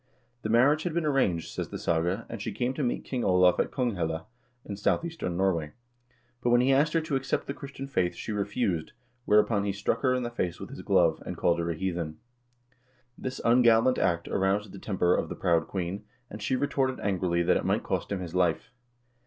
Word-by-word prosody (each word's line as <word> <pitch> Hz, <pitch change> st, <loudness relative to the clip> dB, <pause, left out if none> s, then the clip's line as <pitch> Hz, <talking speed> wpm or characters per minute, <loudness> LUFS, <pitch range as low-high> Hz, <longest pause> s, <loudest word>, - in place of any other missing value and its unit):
The 110 Hz, -, -3 dB
marriage 135 Hz, +7 st, +4 dB
had 170 Hz, -1 st, -3 dB
been 170 Hz, -2 st, 0 dB
arranged, 130 Hz, -, +1 dB
says -, -, -5 dB
the -, -, -5 dB
saga,1 85 Hz, +6 st, 0 dB
and 115 Hz, -3 st, -7 dB
she 110 Hz, -, -3 dB
came 120 Hz, +5 st, -1 dB
to 150 Hz, -, -4 dB
meet 125 Hz, -3 st, -1 dB
King 125 Hz, -3 st, -2 dB
Olav 90 Hz, -1 st, +4 dB
in -, -, +2 dB
Konghelle, 90 Hz, -, -2 dB, 0.4 s
in 100 Hz, -, -5 dB
south 105 Hz, +10 st, 0 dB
eastern 155 Hz, -, -4 dB
Norway, 85 Hz, -6 st, 0 dB, 0.7 s
but 120 Hz, -, +1 dB
when 120 Hz, 0 st, +5 dB
he 135 Hz, +2 st, +3 dB
asked 150 Hz, +3 st, +3 dB
her 165 Hz, -, +3 dB
to 155 Hz, -3 st, -2 dB
accept 135 Hz, 0 st, -1 dB
the 140 Hz, -, -4 dB
Christian 140 Hz, -1 st, -8 dB
faith, 90 Hz, -10 st, 0 dB
she -, -, -6 dB
refused, 100 Hz, -5 st, -1 dB, 0.3 s
whereupon 105 Hz, 0 st, +3 dB
he 100 Hz, -, 0 dB
struck 100 Hz, +1 st, -1 dB
her 130 Hz, -2 st, +3 dB
in 125 Hz, -, -1 dB
the 120 Hz, -, -3 dB
face 90 Hz, -7 st, -2 dB
with -, -, -8 dB
his -, -, -8 dB
glove, -, -, +3 dB
and -, -, -6 dB
called 85 Hz, -1 st, +2 dB
her 85 Hz, 0 st, -1 dB
a 85 Hz, -, -1 dB
heathen. 85 Hz, -3 st, -3 dB, 1.0 s
This 130 Hz, 0 st, -5 dB
ungallant 120 Hz, +1 st, +5 dB
act 85 Hz, -2 st, +1 dB
aroused 100 Hz, +1 st, 0 dB
the 100 Hz, -, -9 dB
temper 90 Hz, -4 st, +1 dB
of -, -, 0 dB
the -, -, -5 dB
proud 85 Hz, -2 st, +1 dB
queen, 95 Hz, +2 st, -4 dB, 0.3 s
and 105 Hz, -, -8 dB
she 105 Hz, +5 st, 0 dB
retorted 130 Hz, -1 st, 0 dB
angrily 90 Hz, -3 st, 0 dB
that -, -, +3 dB
it -, -, -3 dB
might -, -, 0 dB
cost -, -, -2 dB
him 100 Hz, -2 st, -2 dB
his 85 Hz, -2 st, -6 dB
life. 90 Hz, +1 st, +1 dB
105 Hz, 215 wpm, -28 LUFS, 90-130 Hz, 1.0 s, when